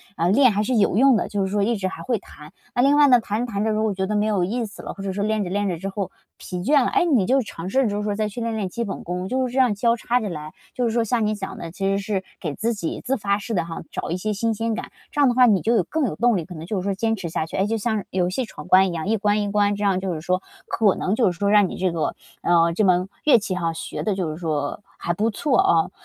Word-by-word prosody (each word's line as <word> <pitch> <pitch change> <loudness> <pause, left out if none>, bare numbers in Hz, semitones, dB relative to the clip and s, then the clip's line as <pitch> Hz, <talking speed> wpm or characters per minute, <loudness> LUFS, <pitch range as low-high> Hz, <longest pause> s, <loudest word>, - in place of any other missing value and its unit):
呃， 170 -1 +1
练 255 +4 +6
还 205 +1 +1
是 250 +4 0
有 205 -4 +3
用 260 +2 +5
的， - - -1
就 200 -2 -1
是 190 - -4
说 205 0 +1
一 230 +4 +1
直 195 -3 -2
还 - - -8
会 245 -3 0
弹。 150 -2 -14 0.2
啊， 245 - +2
另 280 +3 +4
外 295 0 +6
呢， 250 -2 +7
弹 220 +1 -2
着 245 - -8
弹 200 0 -1
着 220 - +1
如 215 0 0
果 215 -2 +1
觉 190 0 -2
得 210 - -1
没 210 0 +2
有 205 -5 +1
意 235 +6 -2
思 210 - -10
了， - - -6
或 195 - -9
者 195 - -2
说 200 +2 -2
练 215 -1 0
着 180 - -4
练 205 +2 0
着 175 -3 -2
之 195 +4 -4
后 195 -1 -3 0.3
疲 180 - -6
倦 285 +4 +4
了， - - +1
诶， 390 -3 +3
你 260 - +3
就 265 +6 +3
尝 180 -6 -7
试 265 +6 +2
着 235 - +1
就 205 - -2
是 210 - -2
说 205 -1 -1
再 215 0 0
去 210 - -7
练 230 -1 -2
练 205 -4 -2
基 235 +6 -3
本 200 -4 -5
功， 180 +2 -4
就 260 +3 0
是 245 - -8
这 265 - +1
样 250 -4 +4
交 230 +3 +2
叉 240 +1 0
着 215 -4 -3
来， 155 -3 -6 0.2
就 250 - 0
是 230 - +1
说 235 +1 +1
像 225 0 0
你 215 - +1
想 195 -2 -6
的， 165 - -7
其 195 +3 -4
实 195 0 +2
是 200 -1 -2 0.2
给 155 -5 -3
自 230 +2 -1
己 185 -7 -4
自 270 +2 0
发 200 -2 0
式 225 +3 -5
地 175 - +1
哈， 165 -1 -6
找 - - -4
一 175 - 0
些 215 +4 -2
新 225 +3 0
鲜 225 +1 -2
感， - - -6 0.2
这 - - -4
样 285 - +6
的 245 - +3
话 250 0 +7
你 200 -5 +3
就 230 +2 +2
有 200 - +3
更 310 - -1
有 195 - -2
动 235 +3 +3
力， 170 - -3
可 180 - -10
能 160 +1 -7
就 200 +3 -3
是 - - -5
说 200 +1 0
坚 225 +3 0
持 190 -5 -5
下 160 - -2
去， - - -6
诶， 190 - +2
就 225 +2 -1
像 220 -1 -1
游 180 -1 +1
戏 245 +8 -2
闯 - - -11
关 190 +1 +6
一 - - -4
样， 165 +1 -4
一 220 +1 +2
关 210 0 +1
一 205 -1 -2
关， 205 0 +2
这 205 - -4
样 195 -2 +2
就 190 -1 -2
是 155 - -5
说 185 +2 0 0.3
可 210 -4 +2
能 190 - -1
就 225 -6 +3
是 175 - -9
说 200 - +1
让 205 -1 +5
你 - - -7
这 185 -1 0
个， 165 -2 -2 0.3
嗯， 170 -1 +4
这 215 - +2
门 180 0 +2 0.2
乐 295 - +7
器 200 -3 -3
哈， 165 -3 -1
学 - - -5
得 210 - 0
就 185 -4 -2
是 155 - -5
说 155 -1 -2 0.2
还 170 - -1
不 210 +6 0
错 255 +5 +1
哦。 165 -1 +3
205 Hz, 355 characters per minute, -23 LUFS, 185-230 Hz, 0.3 s, 呢